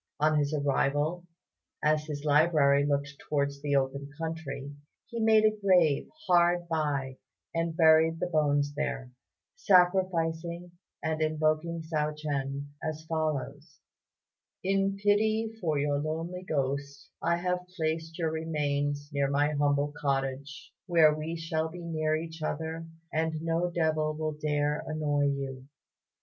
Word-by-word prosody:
On 155 0 +3
his 145 0 0
arrival, 145 +3 0 0.6
as 155 0 +2
his 150 -1 -5
library 145 -2 +4
looked 140 0 -1 0.2
towards 140 -1 0
the 145 -1 0
open 140 +1 0
country, 160 -4 -5 0.3
he 235 - -6
made 220 -1 +5
a 215 0 +3
grave 175 -7 +4 0.2
hard 175 - +3
by 145 -5 -1 0.4
and 165 -1 -1
buried 160 0 +5
the - - 0
bones 145 -4 +1
there, 130 -3 -3 0.4
sacrificing, 175 - +2 0.3
and 160 0 -1
invoking 155 +1 0
Hsiao 155 -2 -1
ch'ien 140 -1 -3
as 155 0 -4
follows: 155 -4 -3 0.9
"In 195 +1 +1
pity 215 +2 +1
for 155 -4 0
your 145 0 +1
lonely 165 +4 -3
ghost, 140 -4 -3
I 170 +1 +2
have 180 0 -2
placed 160 0 -2
your 165 -2 0
remains 145 -2 -1
near 140 -1 +1
my 145 +2 +2
humble 145 0 +1
cottage, 135 0 -3 0.2
where 165 -4 +6
we 155 +2 -4
shall 160 0 -2
be 175 +1 -9
near 155 -1 0
each 160 0 -6
other, 160 +2 -3 0.3
and 160 0 0
no 165 +2 0
devil 155 -2 0
will 155 0 -2
dare 150 0 -1
annoy 150 -2 0
you. 135 -2 -3
155 Hz, 135 wpm, -29 LUFS, 145-165 Hz, 0.9 s, where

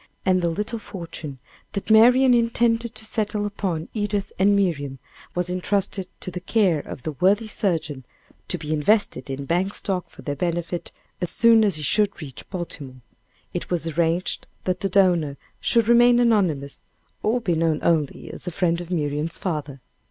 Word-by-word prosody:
And 185 -1 +3
the 170 - +1
little 210 +7 -3
fortune 165 -8 -8 0.4
that 200 +2 -3
Marian 250 +4 +7
intended 235 -1 +2
to 220 0 -5
settle 210 -1 -1
upon 185 -6 -3
Edith 205 -2 -2
and 200 +2 +5
Miriam, 145 -9 0 0.4
was 180 0 0
intrusted 190 +1 -1
to 185 - -4
the 180 - -5
care 185 -3 +2
of 130 - -8
the 155 - -2
worthy 195 - +2
surgeon, 160 -10 -2 0.4
to - - -2
be 155 0 -3
invested 155 - +2
in 135 +1 -4
bank 180 +6 0
stock 185 -3 -1
for - - -14
their 145 - -3
benefit, 175 +2 -3 0.3
as 175 - -1
soon 230 -1 +5
as 200 -5 +2
he 155 - -3
should 205 +7 +2
reach 140 -6 -9
Baltimore. 145 -8 -7 0.5
It 175 - -4
was 175 -2 -1
arranged 165 +2 0 0.2
that 185 -1 -1
the 195 - 0
donor 175 -7 +3 0.2
should 230 -2 +2
remain 240 +1 +6
anonymous, 185 - +1 0.4
or 225 +4 +1
be 195 -7 0
known 160 -1 +1
only 155 -4 0
as - - -7
a - - -1
friend 170 -1 0
of 175 - -9
Miriam's 155 -1 -1
father. 150 -7 -4
180 Hz, 170 wpm, -23 LUFS, 160-210 Hz, 0.5 s, Marian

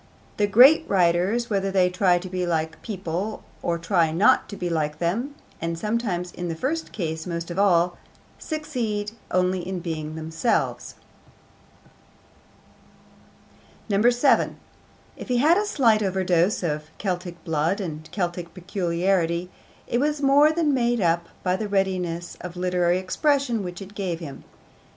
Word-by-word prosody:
The 205 - +2
great 255 +11 +7
writers, 190 +6 +2
whether 195 -1 +1
they 190 -2 +3
try 180 -1 +3
to 180 +2 -6
be 185 0 -3
like 160 -2 0
other 165 - -20
people 195 0 -4 0.2
or 170 0 0
try 170 -1 +1
not 185 +6 +3
to 200 - -7
be 180 - -3
like 155 -3 -1
them 225 - -2 0.3
(and 165 0 -2
sometimes 200 -3 -2
in 175 - -5
the 165 - -3
first 310 - -2
case 160 -3 -4
most 170 0 -4
of 175 - -3
all), 175 -3 +3 0.4
succeed 240 -10 -3 0.2
only 185 0 +1
in 180 +1 -4
being 155 -3 -5
themselves. 160 +8 -1 2.9
7. 240 +6 +3 0.6
If - - -8
he 250 -2 +1
had 320 +9 +5
a 420 - -1
slight 230 - +3
overdose 185 -1 +1
of 150 -2 -2
Celtic 180 -3 -4
blood 165 +4 0
and 155 -5 -6
Celtic 175 -3 -3
peculiarity, 180 -1 -1 0.3
it 240 - 0
was 295 +2 0
more 285 +2 +5
than 315 -3 +1
made 240 -2 +1
up 170 -2 +1 0.2
by 180 -1 +1
the 210 +3 -3
readiness 180 -3 -1
of 180 0 -7
literary 180 -1 +1
expression 240 +5 +1
which 180 +1 -6
it 195 +1 -13
gave 185 -5 -3
him. 145 -6 -9
185 Hz, 145 wpm, -24 LUFS, 170-215 Hz, 2.9 s, great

